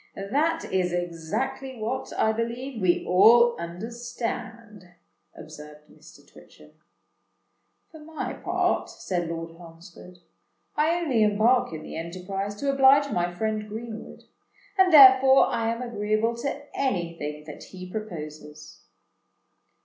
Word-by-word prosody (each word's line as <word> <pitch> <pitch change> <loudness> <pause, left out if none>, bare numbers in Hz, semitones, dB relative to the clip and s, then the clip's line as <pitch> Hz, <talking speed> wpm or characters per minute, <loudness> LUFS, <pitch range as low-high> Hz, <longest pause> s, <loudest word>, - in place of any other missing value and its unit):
"That 300 +12 -1
is 180 -2 +1
exactly 175 +11 -4
what, 230 +4 -4
I 220 - +3
believe, 235 +2 -4
we 180 -2 +1
all 235 +6 +6
understand," 225 0 -7 0.4
observed 150 -1 -13
Mr. - - -18
Twitchem. - - -18 1.2
"For 315 - -13
my 315 +1 -6
part," - - -1
said 175 -3 -4
Lord 165 0 -5
Holmesford, 170 +2 -14 0.6
"I 310 +3 +2
only 270 -10 0
embark 215 +3 +3
in 155 -1 -7
the - - -9
enterprise 185 +4 -5
to 275 +6 -1
oblige 275 +1 +5
my 175 0 -1
friend 215 +3 -3
Greenwood; 220 +1 -8 0.5
and 380 -2 +4
therefore 265 -2 +8
I 225 0 -1
am 230 +2 -4
agreeable 220 0 -1
to 280 +4 -4
any 175 -11 -1
thing 150 -1 -6
that 150 -1 -10
he 185 -1 -10
proposes." 155 -7 -8
215 Hz, 120 wpm, -25 LUFS, 175-250 Hz, 1.2 s, therefore